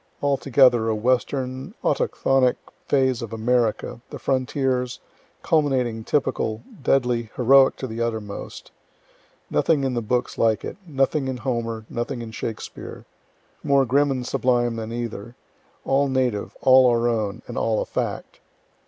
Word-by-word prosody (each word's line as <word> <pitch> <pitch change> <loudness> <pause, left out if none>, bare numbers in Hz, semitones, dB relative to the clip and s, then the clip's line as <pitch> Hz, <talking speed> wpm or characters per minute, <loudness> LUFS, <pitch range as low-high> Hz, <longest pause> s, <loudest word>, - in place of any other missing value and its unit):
Altogether 135 -4 +4
a 110 - +1
western, 130 +3 -1
autochthonic 130 -2 +2 0.3
phase 130 -3 +2
of 115 -2 -6
America, 115 0 0
the - - -7
frontiers, 130 -1 -1 0.4
culminating, 130 -7 +1
typical, 115 -4 -1 0.2
deadly, 125 -4 +1
heroic 135 +2 +5
to - - -5
the 115 -1 -5
uttermost 110 -3 -5 0.8
nothing 150 -4 +2
in 135 -1 0
the 120 - -1
books 120 +3 -2
like 110 -2 +2
it, - - -6
nothing 135 -1 0
in 130 -1 -3
Homer, 115 -2 -3
nothing 120 0 -4
in 115 - -8
Shakspere; 110 0 -7 0.6
more 140 -1 +3
grim 140 +4 +3
and 130 -2 -2
sublime 120 -2 +1
than 110 0 -5
either, 115 -1 -5 0.5
all 140 +1 +2
native, 130 -6 -1
all 130 -1 +6
our 120 0 +2
own, 110 -4 -2
and - - -8
all 110 -1 0
a - - -1
fact. - - -4
125 Hz, 135 wpm, -23 LUFS, 115-135 Hz, 0.8 s, all